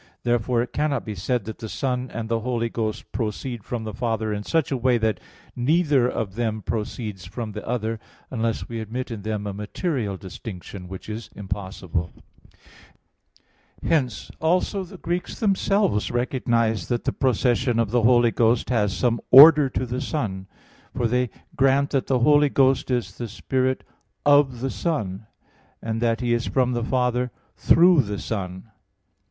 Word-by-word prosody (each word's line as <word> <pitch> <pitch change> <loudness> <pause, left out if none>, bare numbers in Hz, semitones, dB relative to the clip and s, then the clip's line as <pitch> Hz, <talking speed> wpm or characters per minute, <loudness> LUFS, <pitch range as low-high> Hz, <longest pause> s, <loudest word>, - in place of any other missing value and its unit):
Therefore 120 0 +1
it 125 - -9
cannot 145 -4 0
be 110 - -4
said 105 +4 -2
that 110 0 -7
the 110 - -6
Son 125 0 -2
and 115 -1 -4
the 115 0 0
Holy 115 0 -1
Ghost 110 -2 -4
proceed 115 0 -4
from 120 +1 -4
the 110 -1 -5
Father 110 -1 -1
in 105 - -3
such 160 +8 0
a - - +1
way 125 0 +2
as 115 - -1
that 110 -4 +1 0.4
neither 145 -1 +3
of 100 -6 -3
them 110 -1 -2
proceeds 105 -4 -4
from 110 +3 -5
the 105 0 -7
other, 115 -2 -2 0.3
unless 115 -3 -2
we 115 -1 -5
admit 120 +4 -5
in 110 -3 -5
them 105 0 -3
a 100 - -3
material 105 - -3
distinction; 95 -1 -8
which 95 +1 -9
is 110 +1 -6
impossible. 95 -3 -4 1.7
Hence 135 -7 0
also 180 +4 +1
the 185 +1 -11
Greeks 175 +1 -3
themselves 195 - +1
recognize 120 -4 0
that 120 -1 -1
the 135 - -1
procession 125 -1 +1
of 115 -3 +1
the 120 0 +3
Holy 120 0 +5
Ghost 115 +2 +2
has 105 -5 +1
some 120 -2 +1
order 150 +1 +9
to 130 - -2
the 125 +2 -3
Son. 105 -11 -3 0.5
For 120 - 0
they 125 +1 +1 0.3
grant 135 +1 +3
that 135 -2 0
the 130 - +2
Holy 145 +2 +5
Ghost 135 -1 +2
is 125 -2 -2
the 120 - -3
Spirit 130 +4 -1 0.4
"of 145 -4 +4
the 135 0 -1
Son"; 105 - -3 0.5
and 115 0 -3
that 115 0 +1
He 120 -1 +1
is 120 0 0
from 125 -2 +1
the 120 -1 -1
Father 125 0 0 0.3
"through 175 -2 +5
the 105 -4 -4
Son." 95 -4 -4
120 Hz, 170 wpm, -24 LUFS, 110-130 Hz, 1.7 s, order